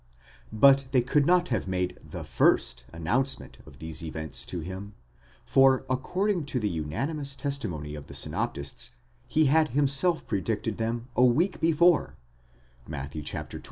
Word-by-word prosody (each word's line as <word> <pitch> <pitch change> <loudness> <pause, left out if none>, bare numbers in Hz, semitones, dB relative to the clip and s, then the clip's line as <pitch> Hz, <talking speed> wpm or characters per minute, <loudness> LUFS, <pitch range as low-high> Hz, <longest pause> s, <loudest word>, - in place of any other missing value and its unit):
But 135 +5 +5
they 125 -2 +4
could 140 +3 +2
not 180 0 +4
have 110 -6 -1
made 90 -1 -2
the - - -7
first - - +2
announcement 120 +12 -2
of 70 - -14
these 80 +1 -6
events 80 -2 -4
to 90 - -3
him, 95 +4 -7 0.5
for, 135 -1 +4
according 180 +7 0
to 135 -2 -1
the 105 - 0
unanimous 135 - -3
testimony 110 - -4
of 75 -1 -8
the - - -9
synop - - -1
tists, 70 0 -4 0.4
he 155 0 +3
had 155 +3 +4
himself 145 +5 +3
predicted 105 +2 -2
them 115 +1 -2
a 125 - +4
week 155 +10 +3
before 165 +1 +3 0.7
(Matt. 70 -2 -6
120 Hz, 145 wpm, -27 LUFS, 85-140 Hz, 0.7 s, But